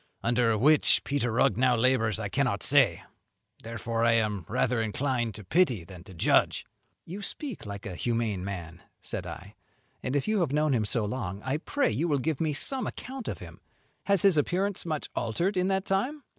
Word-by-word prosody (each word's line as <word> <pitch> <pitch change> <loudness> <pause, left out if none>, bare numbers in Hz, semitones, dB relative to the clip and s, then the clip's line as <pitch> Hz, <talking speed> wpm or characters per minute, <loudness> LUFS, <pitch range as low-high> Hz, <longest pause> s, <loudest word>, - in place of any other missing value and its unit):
Under 115 -1 +2
which 150 +6 +4
Peter 135 -4 -1
Rugg 110 -2 +2
now 125 0 +4
labours 115 -3 +2
I - - -2
cannot - - 0
say; - - +4 0.6
therefore 115 0 -3
I 115 0 +4
am 105 -6 0
rather 120 -2 +1
inclined 120 0 -1
to 105 - -9
pity 125 - +2
than 85 0 -12
to 95 - -12
judge." 80 - +2 0.4
"You 190 +5 -7
speak 240 - -5
like 100 +1 -7
a 95 - -5
humane 115 -3 -1
man," 85 -3 -6 0.2
said - - -5
I, - - -9 0.5
"and 130 - -2
if 140 - 0
you 215 -1 +2
have 165 -7 +1
known 150 0 +2
him 110 -4 +1
so 105 +1 0
long, 100 -4 -4
I 135 +3 -1
pray 285 - 0
you 140 +11 0
will 145 -3 +2
give 150 +2 -2
me 160 -2 +1
some 260 - 0
account 260 -2 -7
of - - -3
him. - - -12 0.4
Has 200 -3 +2
his 195 -5 +5
appearance 180 +5 0
much 155 -2 -2
altered 170 - -1
in 180 0 +1
that 190 0 0
time?" 255 +10 -1
125 Hz, 195 wpm, -28 LUFS, 110-170 Hz, 0.6 s, his